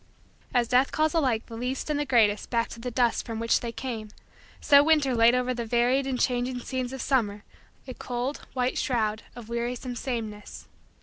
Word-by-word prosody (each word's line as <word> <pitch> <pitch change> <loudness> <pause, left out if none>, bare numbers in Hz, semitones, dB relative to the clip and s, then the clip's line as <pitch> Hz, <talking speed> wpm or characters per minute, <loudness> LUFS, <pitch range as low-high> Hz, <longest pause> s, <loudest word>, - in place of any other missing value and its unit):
As 240 -1 +2
death 255 +3 +3
calls 310 +1 +1
alike 260 -9 +1
the 230 - -10
least 250 +3 -3
and 300 -1 -1
the 295 - -2
greatest 215 -5 +3
back 230 -1 0
to 235 - -9
the 250 +2 -4
dust 240 -1 +1
from 225 -2 -5
which 230 0 +2
they 235 - -4
came, 230 -3 -5 0.5
so 285 0 +6
winter 300 -4 +3
laid 230 +1 +5
over 250 0 0
the 240 -1 -3
varied 245 +4 +1
and 255 -2 -2
changing 250 0 0
scenes 255 0 -3
of 265 -1 -5
summer 210 -6 0 0.4
a 255 - -6
cold, 245 +3 -4
white, 250 0 0
shroud 220 -3 0
of 240 -3 -10
wearisome 240 +1 -3
sameness. 225 -5 -5
245 Hz, 190 wpm, -27 LUFS, 230-260 Hz, 0.5 s, so